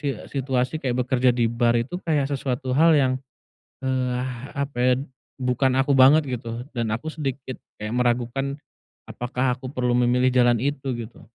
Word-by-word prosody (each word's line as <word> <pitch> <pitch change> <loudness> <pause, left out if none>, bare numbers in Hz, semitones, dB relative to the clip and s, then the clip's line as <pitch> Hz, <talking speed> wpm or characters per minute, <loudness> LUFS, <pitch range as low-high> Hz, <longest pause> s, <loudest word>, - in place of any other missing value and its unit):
si 145 - -2 0.3
situasi 130 +3 -1
kayak 125 -2 0
bekerja 125 0 +3
di 120 - +2
bar 120 0 +2
itu, 130 +10 -2
kayak 150 -5 0
sesuatu 130 -1 -2
hal 160 +4 +5
yang, 130 -3 +3 0.7
eee, 130 -1 0 0.4
apa 140 -2 -3
ya, 125 0 +4 0.4
bukan 130 0 +1
aku 135 +1 +2
banget 135 +4 +6
gitu, 120 -2 -5
dan 115 -3 -1
aku 155 +8 -4
sedikit 135 -3 -4 0.2
kayak 105 +2 -5
meragukan 125 +3 0 0.5
apakah 125 +1 -1
aku 130 0 -7
perlu 125 -2 0
memilih 125 +1 +3
jalan 120 -1 +4
itu, 140 0 -2
gitu? 115 0 -9
130 Hz, 160 wpm, -24 LUFS, 120-135 Hz, 0.7 s, banget